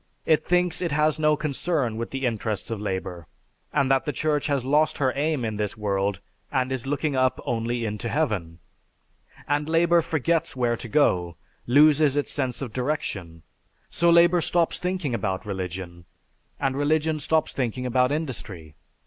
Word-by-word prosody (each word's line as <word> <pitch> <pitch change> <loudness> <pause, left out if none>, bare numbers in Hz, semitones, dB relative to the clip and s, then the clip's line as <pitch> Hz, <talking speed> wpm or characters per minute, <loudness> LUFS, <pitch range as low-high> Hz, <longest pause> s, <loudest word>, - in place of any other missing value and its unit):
It 155 -1 +3
thinks 180 0 +1
it 170 -3 -1
has 155 +1 +2
no 150 0 +3
concern 145 -4 -1
with 115 +1 -4
the 135 0 -3
interests 110 -3 -2
of 110 -3 -3
labor; 95 -4 -4 0.4
and 140 -2 +1
that 135 -1 +3
the 150 - -1
Church 150 +1 0
has 140 -4 0
lost 150 +3 +2
her 130 -2 +1
aim 145 -3 0
in 110 -2 -3
this 105 +2 -3
world 100 -2 -1 0.3
and 130 0 0
is 130 -1 -3
looking 145 +1 -1
up 130 -1 +2
only 120 0 -1
into 105 +2 -3
heaven. 105 - -1 0.9
And 145 +1 0
labor 170 +1 +4
forgets 165 +1 0
where 120 -2 +1
to 120 - -8
go, 90 - +1 0.3
loses 145 +2 +5
its 145 - -1
sense 130 -1 -1
of 120 -5 -7
direction. 105 - -3 0.5
So 170 - +2
labor 170 +1 +5
stops 170 +1 +1
thinking 180 -7 -2
about 95 -4 -2
religion, 90 -3 -6 0.5
and 135 -2 0
religion 155 +2 +1
stops 160 +2 0
thinking 125 -1 -2
about 125 +1 +2
industry. 110 - -5
135 Hz, 165 wpm, -25 LUFS, 110-155 Hz, 0.9 s, loses